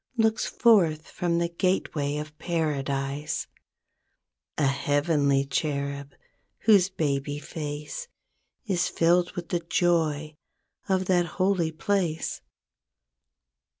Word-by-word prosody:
Looks 220 -1 +2
forth 170 -10 +3
from 170 -1 0
the 170 0 +1
gateway 170 -5 -1
of 150 0 -6
Paradise; 145 -3 -2 1.1
A 150 - +2
heavenly 140 0 +2
cherub 140 -1 -2 0.5
whose 200 -4 +5
baby 145 -5 -1
face 150 - -6 0.6
Is 185 -5 +1
filled 175 +1 +2
with 175 -1 -6
the 175 - 0
joy 155 -3 +1 0.5
of 190 -1 +2
that 175 -2 +2
holy 185 -3 +2
place. 170 -1 -1
160 Hz, 95 wpm, -27 LUFS, 145-180 Hz, 1.1 s, whose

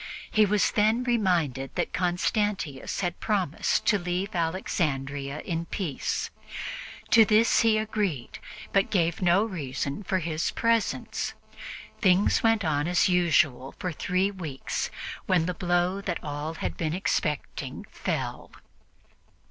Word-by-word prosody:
He 215 -1 +4
was 205 0 +2
then 220 +4 +3
reminded 175 - 0
that - - -1
Constantius 180 - -1
had 175 -2 -2
promised 190 -8 0
to 205 - +4
leave 180 +3 -2
Alexandria 145 -5 -1
in 165 -1 -3
peace. 165 -9 -2 0.8
To 225 - +8
this 215 +2 +4
he 225 -1 +4
agreed, 205 - -2 0.3
but 195 -1 +3
gave 170 -3 +1
no 185 +4 +4
reason 140 -5 -4
for 190 -1 0
his 160 -2 -1
presence. 230 -1 0 0.6
Things 190 -1 +4
went 225 -4 +3
on 150 -1 +1
as 175 +1 +3
usual 155 -7 +2
for 180 - -3
three 185 +5 0
weeks, 160 -9 -4 0.4
when 180 -3 +3
the 180 - -1
blow 175 +2 0
that 180 -4 -2
all 150 +2 -4
had 90 - -4
been 155 +6 -1
expecting 155 -5 -2
fell. - - -3
180 Hz, 125 wpm, -27 LUFS, 155-200 Hz, 0.8 s, To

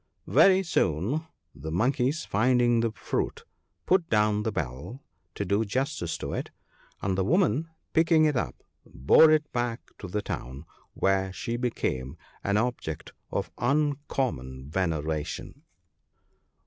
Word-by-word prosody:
Very 190 0 +5
soon 135 - 0 0.3
the 80 - -7
monkeys 130 - +1
finding 120 +2 +3
the 115 -1 +1
fruit, - - -3 0.4
put 180 -2 +2
down 105 -1 +3
the 110 - -1
bell, 80 - -5 0.3
to 100 - -2
do 100 +4 +2
justice 115 - -2
to - - -5
it, - - -3 0.5
and 95 -1 +1
the 95 - +1
woman 165 - +2 0.2
picking 160 -1 +5
it 150 -2 +2
up, 75 - -3 0.2
bore 115 - +5
it 155 -1 +2
back 120 -1 -1 0.2
to 100 - -6
the 105 +3 -2
town, 65 -1 -6 0.3
where 95 0 +1
she 115 +5 -4
became 85 - -2 0.3
an 100 +1 +1
object 115 -9 -2 0.2
of - - -3
uncommon 130 - -1
veneration. 80 -4 -2
115 Hz, 130 wpm, -27 LUFS, 85-140 Hz, 0.5 s, Very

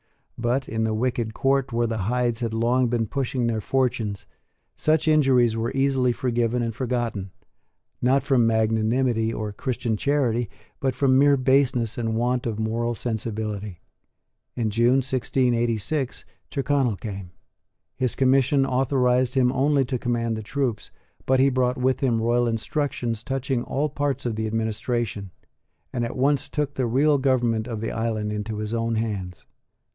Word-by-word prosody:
But, 125 +3 -1
in 110 0 -2
the 110 -1 0
wicked 115 -1 -1
court 135 -1 +1
where 120 0 +1
the 115 -1 -2
Hydes 120 -2 0
had 115 -2 -2
long 120 +2 +2
been 115 -1 0
pushing 130 +1 -2
their 115 -2 0
fortunes, 115 -5 -1 0.5
such 155 0 +1
injuries 130 -7 +4
were 115 +2 -1
easily 135 -2 +2
forgiven 120 -1 0
and 115 -1 -2
forgotten, 120 -5 -2 0.7
not 130 +2 +3
from 130 -5 +3
magnanimity 110 +1 +1
or 105 -2 -4
Christian 120 0 -2
charity, 120 -4 +1 0.3
but 130 -2 -1
from 130 0 +3
mere 140 0 +5
baseness 130 -3 +2
and 115 -1 -1
want 120 +1 0
of 110 -2 -3
moral 115 +2 -1
sensibility. 105 -5 -4 0.7
In 110 -3 -1
June 120 +5 +3
1686, 125 0 -1 0.2
Tyrconnel 135 -4 +1
came. 95 -1 -7 0.7
His 125 -2 -1
commission 135 +1 +3
authorised 130 -1 +1
him 125 -2 +3
only 135 +1 +2
to 125 0 -2
command 115 -2 -1
the 110 - -4
troops, 120 -1 -2 0.4
but 130 0 +3
he 135 +1 +5
brought 125 0 +1
with 130 +1 +1
him 120 -4 +1
royal 120 +2 +2
instructions 115 -1 -2
touching 135 -1 -1
all 145 +4 -1
parts 145 -2 -2
of 115 -3 -1
the 110 0 -2
administration, 110 -1 -2 0.6
and 120 -2 -1
at 120 +3 -4
once 140 +1 +1
took 145 -1 -2
the 130 -3 -1
real 140 +5 +3
government 120 -4 +1
of 115 -3 -4
the 115 - -3
island 110 -2 -2
into 105 +1 -4
his 105 +1 -4
own 115 0 0
hands. 100 -5 -4
120 Hz, 155 wpm, -24 LUFS, 110-130 Hz, 0.7 s, mere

